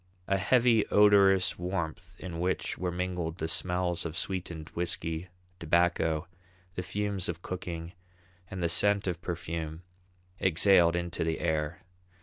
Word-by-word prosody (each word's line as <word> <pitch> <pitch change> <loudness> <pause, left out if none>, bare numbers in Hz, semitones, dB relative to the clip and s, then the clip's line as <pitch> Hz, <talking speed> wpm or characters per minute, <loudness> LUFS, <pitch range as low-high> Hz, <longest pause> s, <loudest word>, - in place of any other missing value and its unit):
A 95 0 +1
heavy 115 +1 +4
odorous 100 -3 +5
warmth 90 -1 -4
in 85 -3 -6
which 90 +2 -1
were 90 -1 -2
mingled 90 -2 -3
the 80 - -2
smells 90 +1 0
of 80 -1 -5
sweetened 85 -3 -4
whisky, 85 0 -3 0.3
tobacco, 85 -1 +1 0.5
the 90 - -3
fumes 100 -1 -2
of 85 0 -5
cooking, 90 -2 -5 0.6
and 95 -2 -4
the - - +3
scent 100 +4 +4
of 90 -2 -3
perfume, 80 -2 -5 0.6
exhaled 85 -1 +4
into 85 -1 -2
the 80 0 -1
air. 75 +1 -1
90 Hz, 135 wpm, -29 LUFS, 85-95 Hz, 0.6 s, odorous